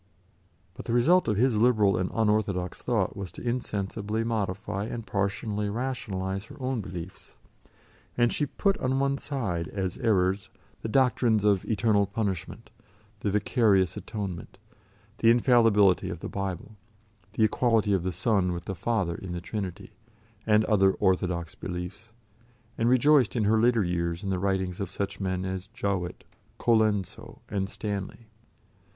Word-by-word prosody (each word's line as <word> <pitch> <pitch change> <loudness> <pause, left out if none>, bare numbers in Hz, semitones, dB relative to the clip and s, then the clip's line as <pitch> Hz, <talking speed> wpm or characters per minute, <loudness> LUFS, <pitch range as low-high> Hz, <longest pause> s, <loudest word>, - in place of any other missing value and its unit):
But - - -10
the 115 - -2
result 165 +10 +4
of 105 -3 +1
his 120 0 +3
liberal 110 -4 +4
and 90 0 -1
unorthodox 105 -5 0
thought - - 0
was 100 -4 -6
to - - -7
insensibly 110 -2 -2
modify 105 -2 -2
and 115 0 -5
partially 105 +1 -1
rationalise 105 -5 -3
her - - -13
own 130 -3 -1
beliefs, 90 -2 -9 0.8
and 120 -1 +3
she 145 - 0
put 195 +7 0
on 130 0 0
one 140 0 +1
side 95 - -3
as 95 -3 -3
errors 95 -5 +1 0.3
the - - -3
doctrines 120 -3 +3
of 100 -3 +3
eternal 105 -2 +2
punishment, 100 +1 -4 0.5
the 105 - -1
vicarious 100 -3 +2
atonement, 100 -6 -6 0.6
the 115 - +5
infallibility 115 -6 +4
of 85 -3 -5
the - - -4
Bible, 95 0 -4 0.6
the 110 - +1
equality 110 -2 +2
of 95 - +2
the 90 +2 -2
Son 95 0 +1
with 85 0 -6
the 95 - -3
Father 95 -2 -1
in 90 +1 -7
the 90 - -3
Trinity, 95 0 -5 0.6
and 105 0 +4
other 95 -3 +4
orthodox 90 -3 0
beliefs, 95 +5 -7 0.6
and 115 +1 +1
rejoiced 130 0 +4
in 115 - +1
her 110 +2 +3
later 120 -2 +3
years 85 0 -2
in 100 - -2
the 95 - 0
writings 95 -2 -1
of 100 -3 -3
such 100 +1 -4
men 95 -1 -2
as 95 0 -4
Jowett, 95 -3 -3 0.3
Colenso, 110 -5 0
and 100 -2 -2
Stanley. 100 +2 -5
100 Hz, 150 wpm, -27 LUFS, 95-115 Hz, 0.8 s, the